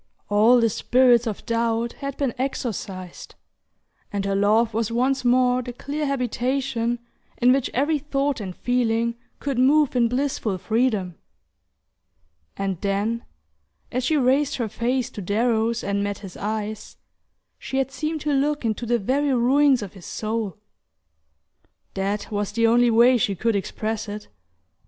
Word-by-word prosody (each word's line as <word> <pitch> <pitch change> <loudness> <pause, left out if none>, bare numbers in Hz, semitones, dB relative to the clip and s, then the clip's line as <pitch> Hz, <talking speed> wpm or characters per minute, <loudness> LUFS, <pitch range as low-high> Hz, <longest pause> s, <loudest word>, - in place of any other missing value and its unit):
All 220 +4 +5
the 230 -1 +3
spirits 240 +1 +3
of 215 - -5
doubt 230 0 0
had 275 -1 -5
been 270 -5 -1
exorcised, 205 -8 -5 0.8
and 200 -1 -2
her 200 - 0
love 215 +3 +3
was 225 0 -1
once 260 +3 +1
more 250 0 +3
the 245 0 -7
clear 290 +4 -3
habitation 250 -2 -1 0.4
in 250 +1 +5
which 270 -2 0
every 290 +4 +1
thought 280 -3 -1
and 185 -3 -6
feeling 235 -2 0 0.3
could 275 -3 -2
move 285 +2 +4
in 240 -1 +4
blissful 250 -5 -1
freedom. 215 -4 0 1.4
And 195 -3 -2
then, 205 +4 -1 0.7
as 255 +1 -1
she 305 +4 +2
raised 270 +2 +2
her 235 -3 -2
face 240 +3 -1
to 205 - -7
Darrow's 225 +3 0
and 200 0 -1
met 205 -1 -2
his 195 -3 -10
eyes, 215 0 -4 0.6
she 265 - -4
had 270 0 0
seemed 310 +2 -3
to 300 -1 0
look 290 0 0
into 225 +1 -2
the 240 +1 +2
very 270 +6 +1
ruins 260 +1 +4
of 200 - -8
his 190 -4 -12
soul. 220 -2 -3 1.4
That 200 +2 -2
was 205 -1 -2
the 230 +1 +2
only 240 +1 +4
way 240 +2 +5
she 210 -4 0
could 225 +4 0
express 215 +2 -3
it. 210 0 -7
235 Hz, 150 wpm, -23 LUFS, 210-260 Hz, 1.4 s, All